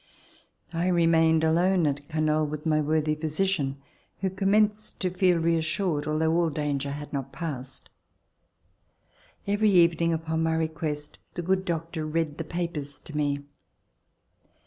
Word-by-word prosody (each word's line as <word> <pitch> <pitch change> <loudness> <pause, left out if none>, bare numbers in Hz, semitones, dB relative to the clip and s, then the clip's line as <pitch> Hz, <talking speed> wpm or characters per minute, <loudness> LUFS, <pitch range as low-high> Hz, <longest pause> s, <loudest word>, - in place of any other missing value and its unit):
I 170 +2 0
remained 165 -2 +4
alone 175 +2 +3
at 145 0 -1
Canoles 155 -1 +1
with 150 +1 -6
my 155 -1 +3
worthy 155 0 +1
physician, 155 -2 0 0.4
who 190 -1 0
commenced 210 +2 +1
to 185 -2 0
feel 180 -1 +3
reassured, 165 -1 0
although 160 +1 +1
all 170 -1 +2
danger 145 -2 -2
had 145 +1 -6
not 135 -1 -3
passed. 135 -6 -6 1.6
Every 205 +2 +2
evening 170 -3 +4
upon 160 0 -1
my 160 0 +1
request 160 -2 -3 0.2
the 175 - -3
good 190 +2 +1
doctor 165 -1 -3
read 155 -1 -1
the - - -1
papers 160 -4 -4
to 155 - -11
me. 145 -1 0
160 Hz, 135 wpm, -27 LUFS, 150-175 Hz, 1.6 s, remained